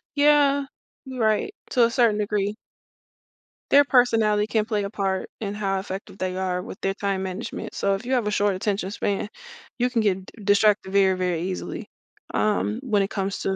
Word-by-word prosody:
Yeah, 285 -1 +4 0.4
you 260 -1 -7
right. 220 - +1 0.2
To 245 -3 +5
a 230 - +1
certain 235 -4 +3
degree. 205 0 -1 1.1
Their 285 +1 +6
personality 225 -5 +3
can 220 -1 +1
play 210 -2 -1
a 200 - -3
part 195 -3 -2
in 205 -2 -3
how 195 -2 -1
effective 190 0 -7
they 185 -1 -2
are 185 -1 -1
with 190 - -9
their 195 0 -1
time 195 -2 -1
management. 190 +4 -5
So 200 0 +1
if 195 +4 -3
you 260 - -1
have 245 -4 +2
a 210 - 0
short 205 -2 +2
attention 195 -1 -1
span, 205 0 -2 0.5
you 250 +1 +1
can 235 -2 +1
get 190 -3 0
d 215 0 -14
distracted 205 -1 +3
very, 190 -1 +4
very 180 -3 -1
easily. 185 +1 -4 0.5
Um, 215 +1 +1
when 215 -7 +1
it 195 - -4
comes 195 -1 -2
to 190 - -1
205 Hz, 190 wpm, -24 LUFS, 195-225 Hz, 1.1 s, Their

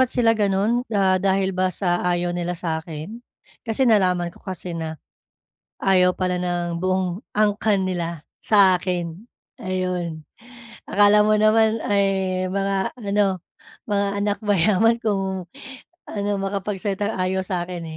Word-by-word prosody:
ba't 260 -1 +3
sila 230 -2 +3
ganun. 210 +3 +1
Ah, 190 -3 +3
dahil 195 0 +1
ba 185 0 +1
sa 175 -1 -1
ayaw 175 0 0
nila 175 0 -3
sa'kin? 160 +5 -5 0.5
Kasi 225 +4 +1
nalaman 180 -5 +2
ko - - -18
kasi 185 -2 -6
na 160 -2 -5 0.8
ayaw 180 -1 +4
pala 180 -1 -1
ng 175 -1 -2
buong 185 +1 -1
angkan 205 -2 +2
nila 170 -4 -3 0.2
sa 195 -3 +5
akin, 175 +1 -4 0.4
ayun. 180 -4 -3 0.7
Akala 205 +1 +5
mo 215 0 +4
naman 220 +1 +4
ay 190 -2 +1
mga 195 +1 -1
ano, 200 -3 0 0.5
mga 200 0 +2
anak 205 0 0
mayaman 210 +4 +3
kung 190 -4 -1 0.6
ano, 205 -1 -3
makapagsalitang 200 +1 -2
ayaw 185 +1 0
sa'kin, 175 -2 -4
190 Hz, 125 wpm, -22 LUFS, 180-205 Hz, 0.8 s, sa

